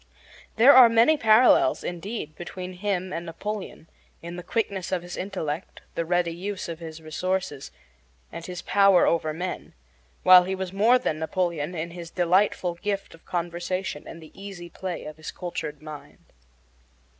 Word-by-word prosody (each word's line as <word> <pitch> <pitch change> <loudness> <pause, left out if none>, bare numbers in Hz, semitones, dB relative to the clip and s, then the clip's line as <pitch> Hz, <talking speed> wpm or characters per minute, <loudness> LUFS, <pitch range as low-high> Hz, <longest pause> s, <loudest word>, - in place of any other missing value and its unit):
There 245 +5 +8
are 250 -2 +9
many 230 +7 +5
parallels, 220 - +5
indeed, 175 -2 -5
between 180 +2 -7
him 185 -1 -2
and 170 - -3
Napoleon 185 0 -6 0.4
in 170 +1 -6
the 180 - -6
quickness 200 -2 -2
of 180 -2 -1
his 175 0 -7
intellect, 180 -4 -5
the 170 - -2
ready 175 0 +1
use 190 +3 -5
of 165 -1 -6
his 160 -1 -9
resources, 170 -2 -3 0.6
and 170 - -7
his 180 0 -7
power 195 -3 +5
over 160 -2 +1
men, 180 +4 -5 0.5
while 185 -1 +8
he 190 +1 -2
was 190 -1 -5
more 220 +6 +5
than 160 -11 -2
Napoleon 170 -1 -2
in 170 +1 -4
his 170 -1 -8
delightful 180 +1 +2
gift 200 -1 -3
of 165 - -18
conversation 175 -1 -3
and 165 0 -10
the 155 - -14
easy 195 -3 -9
play 185 -2 -5
of 155 0 -8
his 155 - -7
cultured 155 -4 -6
mind. 155 -2 -11
180 Hz, 160 wpm, -25 LUFS, 165-195 Hz, 0.6 s, are